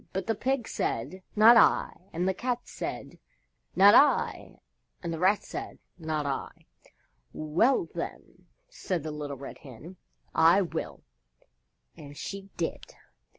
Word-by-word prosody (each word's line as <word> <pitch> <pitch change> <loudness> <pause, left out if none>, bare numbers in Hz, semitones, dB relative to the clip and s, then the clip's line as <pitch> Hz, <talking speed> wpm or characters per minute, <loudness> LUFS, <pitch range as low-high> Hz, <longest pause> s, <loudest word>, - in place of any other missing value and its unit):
But 190 - -3
the 225 - 0
Pig 255 +2 -1
said, 180 +12 -3
"Not 225 +3 +8
I," - - +4 0.2
and 175 +3 -2
the 190 - +2
Cat 245 +5 -2
said, - - -7 0.6
"Not 200 +2 +7
I," 285 +4 +3 0.5
and 170 -1 -3
the 165 - -5
Rat 190 +4 +3
said, - - -7 0.2
"Not 155 -2 -2
I." 140 -1 -5 0.7
"Well, 205 - +1
then," - - -8 0.2
said 185 - -4
the 155 - -4
Little 145 -2 -6
Red 135 +1 -9
Hen, 145 +8 -12 0.4
"I 170 +5 +5
will." 175 - -6 0.9
And 145 -1 -12
she 195 0 -7
did. 165 - -4
185 Hz, 135 wpm, -28 LUFS, 155-215 Hz, 0.9 s, Not